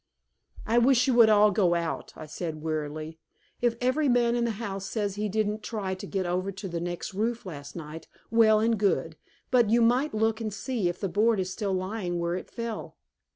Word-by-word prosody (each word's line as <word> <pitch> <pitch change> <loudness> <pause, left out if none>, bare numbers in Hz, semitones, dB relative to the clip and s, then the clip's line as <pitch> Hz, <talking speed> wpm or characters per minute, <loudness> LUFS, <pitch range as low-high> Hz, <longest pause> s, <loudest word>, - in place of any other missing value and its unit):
"I 230 +2 +3
wish 250 0 +4
you 260 - +2
would 235 -2 +7
all 210 0 +6
go 180 -3 +2
out," 170 -1 -3
I - - -8
said 155 0 -6
wearily. 155 0 -4 0.4
"If 240 -1 +2
every 265 +4 +1
man 240 -1 +3
in 240 -1 +1
the 230 - -1
house 195 -3 -4
says 205 -3 -2
he 210 +1 -2
didn't 215 +1 -1
try 210 -4 -3
to 190 +2 -7
get 190 -2 -2
over 180 +2 -1
to 195 +1 -7
the 170 -2 -3
next 175 +3 -4
roof 225 +3 -2
last 145 -5 -8
night, 160 -1 -8 0.2
well 220 -2 +5
and 225 0 +1
good. 165 -6 +1 0.4
But 240 -4 +4
you 235 +1 +4
might 250 +4 +2
look 220 +1 +1
and 215 -1 -2
see 210 -2 -2
if 175 - -5
the 195 - -1
board 215 +3 +2
is 185 0 -2
still 200 -2 -2
lying 185 -1 -2
where 170 0 -1
it 180 - -5
fell." 230 -2 -6
205 Hz, 210 wpm, -27 LUFS, 175-230 Hz, 0.4 s, would